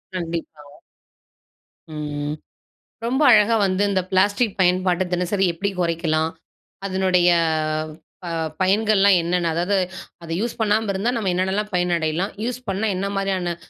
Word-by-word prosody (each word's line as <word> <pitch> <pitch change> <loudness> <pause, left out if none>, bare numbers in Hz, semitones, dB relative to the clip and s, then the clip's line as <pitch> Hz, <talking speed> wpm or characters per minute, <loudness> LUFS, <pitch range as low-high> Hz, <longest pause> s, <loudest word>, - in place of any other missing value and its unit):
கண்டிப்பா. 165 -3 -5 1.3
ம். 150 -1 -4 0.7
ரொம்ப 260 +5 0
அழகா 220 0 +5
வந்து 185 +1 0
இந்த 190 -2 +1
பிளாஸ்டிக் 205 +3 +2
பயன்பாட்ட 185 0 +2
தினசரி 180 +2 +1
எப்டி 195 +4 -2
கொறைக்கலாம்? 165 -2 0 0.6
அதனுடைய 185 -2 +2 1.0
அ - - -4 0.3
பயன்கள்லாம் 200 0 +4
என்னன்ன! 170 0 0
அதாவது, 180 +4 0 0.5
அத 165 - -10
"யூஸ் 235 +2 -2
பண்ணாம 215 0 +1
இருந்தா 200 +5 0
நம்ம 210 -5 0
என்னான்னலாம் 190 +4 -1
பயனடையலாம். 175 +1 0
யூஸ் 245 0 -3
பண்ணா 195 +3 -1
என்னா 195 +2 -2
மாரியான 190 -3 -1
185 Hz, 120 wpm, -22 LUFS, 170-205 Hz, 1.3 s, அழகா